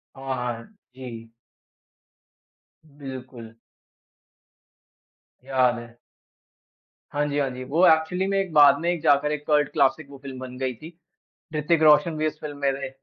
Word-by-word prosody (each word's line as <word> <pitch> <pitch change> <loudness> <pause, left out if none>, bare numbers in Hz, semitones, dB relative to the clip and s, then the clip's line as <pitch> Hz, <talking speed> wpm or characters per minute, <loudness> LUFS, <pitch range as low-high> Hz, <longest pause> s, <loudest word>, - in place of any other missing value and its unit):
हाँ, 135 0 -4
हाँ। 125 - -5 0.2
जी। 115 -3 -9 1.6
बिल्कुल। 130 -5 -10 1.9
याद 130 -2 +1
है। 120 0 -13 1.1
हाँ 145 0 0
जी, 145 0 -2
हाँ 140 -2 0
जी। 125 0 -7
वो 155 +8 +2
एक्चुअली 160 +4 +2
में 195 0 0
एक 195 -3 -2
बाद 145 -2 +7
में 170 +1 -1
जाकर 145 0 +3
एक 150 -1 -4
कल्ट 150 -2 +2
क्लासिक 140 0 +1
वो 140 - -11
फ़िल्म 135 -1 -9
बन 130 -1 -8
गयी 130 -1 -2
थी। 160 +8 -12 0.6
ऋतिक 155 +2 +1
रोशन 155 +2 +5
भी 155 - 0
उस 155 0 -6
फ़िल्म 145 -2 -7
में 140 -1 0
थे। - - -4
140 Hz, 145 wpm, -24 LUFS, 130-155 Hz, 1.9 s, बाद